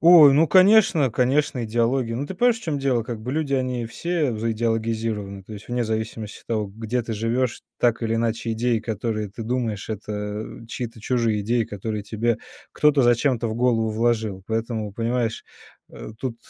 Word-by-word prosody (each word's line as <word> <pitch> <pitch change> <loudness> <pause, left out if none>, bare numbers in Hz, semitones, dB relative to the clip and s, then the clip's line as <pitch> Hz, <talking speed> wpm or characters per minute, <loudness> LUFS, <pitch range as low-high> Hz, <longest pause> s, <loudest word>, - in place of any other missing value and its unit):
Ой, 165 -4 +9
ну 155 +4 +5
конечно, 185 - +5
конечно 130 +1 +1
идеология. 115 +2 0
Ну, 135 +5 -2
ты 190 - -6
понимаешь, 235 +2 +2
в - - -17
чём 150 -3 -2
дело, 135 -4 +1
как 115 -1 -6
бы 125 +4 -4
люди, 150 -2 0
они 125 -2 -1
все 155 +3 -1
заидеологизированы, 110 -3 -2
то 100 - -12
есть 105 0 -9
вне 120 0 0
зависимости 110 -1 -4
от - - -41
того, 110 -2 -1
где 110 +4 -3
ты 115 0 -5
живешь, 115 +3 -1 0.2
так 120 -2 +2
или 115 0 0
иначе 115 0 -1
идеи, 115 +1 +1
которые 110 -1 -3
ты 105 +4 -8
думаешь, 115 -3 -2
это, 105 0 -5 0.5
э, - - -13
чьи-то 115 -1 -6
чужие 115 -2 +1
идеи, 115 +3 +1
которые 105 +1 -5
тебе 110 +2 0 0.3
кто-то 150 -2 +4
зачем-то 120 -1 +2
в 110 - -3
голову 115 -2 +2
вложил. 110 -4 0
Поэтому, 110 -2 -2
понимаешь, 115 +1 -1 0.5
э, - - -9
тут. 120 -3 -4
115 Hz, 180 wpm, -23 LUFS, 110-125 Hz, 0.5 s, Ой